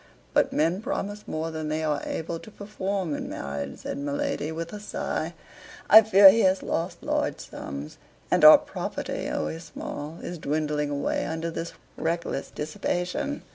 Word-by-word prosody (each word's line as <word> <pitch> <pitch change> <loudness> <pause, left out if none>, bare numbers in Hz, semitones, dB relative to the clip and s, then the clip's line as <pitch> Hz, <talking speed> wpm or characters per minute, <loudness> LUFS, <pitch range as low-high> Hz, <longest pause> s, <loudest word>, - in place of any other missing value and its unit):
"But - - +3
men 165 +6 +1
promise 205 -1 -4
more 160 +1 -3
than 155 -1 -4
they 155 +1 -1
are 150 -2 0
able 165 +1 -3
to 220 - -12
perform 200 -4 -3
in - - -4
marriage," 70 0 -5
said - - -4
my 140 0 -3
lady, 145 +1 -2
with 165 +2 -5
a 210 - -5
sigh. 210 - -3 0.6
"I 220 - +12
fear 200 -2 +9
he 225 - +1
has 190 -3 +3
lost 170 +3 -3
large - - -1
sums; 70 +2 -7 0.3
and - - +3
our - - +12
property, - - -4
always 165 +1 -3
small, 155 0 -7
is 175 -1 -5
dwindling 150 0 -1
away 145 0 -1
under 165 +1 -3
this 165 +1 -5 0.2
reckless 165 -3 -2
dissipation. 180 - -3
165 Hz, 165 wpm, -26 LUFS, 150-190 Hz, 0.6 s, I